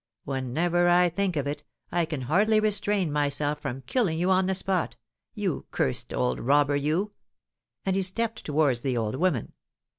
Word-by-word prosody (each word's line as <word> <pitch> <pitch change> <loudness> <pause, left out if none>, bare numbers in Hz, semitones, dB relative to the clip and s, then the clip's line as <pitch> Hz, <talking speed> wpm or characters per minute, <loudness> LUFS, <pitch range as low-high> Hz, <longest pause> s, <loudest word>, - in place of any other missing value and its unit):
Whenever 165 +7 +1
I 175 0 +5
think 185 +1 -1
of 145 -2 -1
it, 145 +1 -4 0.3
I 175 -1 +1
can 155 -4 -4
hardly 205 - +3
restrain 205 -4 +1
myself 145 0 0
from 130 +2 -5
killing 175 - 0
you 180 +3 +1
on 185 0 +3
the 190 - +1
spot 185 -2 -1 0.4
you - - -2
cursed 65 - -1
old 65 0 0
robber, 145 +2 +3
you!" 155 +9 0 0.7
and 190 -1 +1
he 195 - +2
stepped 225 +4 -2
towards 145 -5 +1
the 130 -2 -1
old 110 -2 -1
woman. 150 -4 0
160 Hz, 170 wpm, -27 LUFS, 140-190 Hz, 0.7 s, I